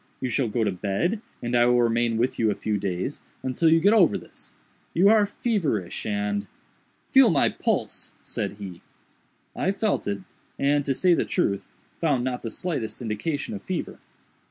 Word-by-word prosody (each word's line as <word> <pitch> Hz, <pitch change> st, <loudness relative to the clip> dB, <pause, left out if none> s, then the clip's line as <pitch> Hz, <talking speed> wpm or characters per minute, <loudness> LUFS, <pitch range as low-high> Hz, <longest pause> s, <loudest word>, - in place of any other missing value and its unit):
You 130 Hz, -, -2 dB
shall 125 Hz, +1 st, +1 dB
go 110 Hz, +1 st, 0 dB
to -, -, +1 dB
bed, 100 Hz, -, -1 dB, 0.2 s
and 120 Hz, +1 st, -1 dB
I 120 Hz, 0 st, +5 dB
will 125 Hz, 0 st, +4 dB
remain 115 Hz, 0 st, +1 dB
with 120 Hz, +3 st, 0 dB
you 110 Hz, -, +3 dB
a -, -, 0 dB
few 105 Hz, -1 st, -2 dB
days, 95 Hz, +7 st, -3 dB, 0.2 s
until 130 Hz, +5 st, +2 dB
you 165 Hz, +1 st, +5 dB
get 200 Hz, +6 st, +4 dB
over 195 Hz, -8 st, +5 dB
this. -, -, -12 dB, 0.4 s
You 185 Hz, +4 st, +6 dB
are 215 Hz, -1 st, +5 dB
feverish 170 Hz, -, -1 dB
and—" 100 Hz, -1 st, -1 dB, 0.6 s
"Feel -, -, +7 dB
my -, -, +3 dB
pulse," -, -, -1 dB
said -, -, -3 dB
he. 100 Hz, -4 st, -9 dB, 0.7 s
I 190 Hz, -, +1 dB
felt 210 Hz, +1 st, -1 dB
it, 100 Hz, -1 st, -2 dB, 0.4 s
and, 145 Hz, +1 st, +2 dB
to 135 Hz, -, 0 dB
say 180 Hz, +4 st, +4 dB
the -, -, +2 dB
truth, 100 Hz, -, -1 dB, 0.3 s
found 145 Hz, -7 st, +1 dB
not 125 Hz, -1 st, -2 dB
the 115 Hz, -, -4 dB
slightest 115 Hz, -9 st, -3 dB
indication 130 Hz, -, -3 dB
of 205 Hz, -, -6 dB
fever. 185 Hz, -3 st, -4 dB
125 Hz, 180 wpm, -25 LUFS, 105-170 Hz, 0.7 s, Feel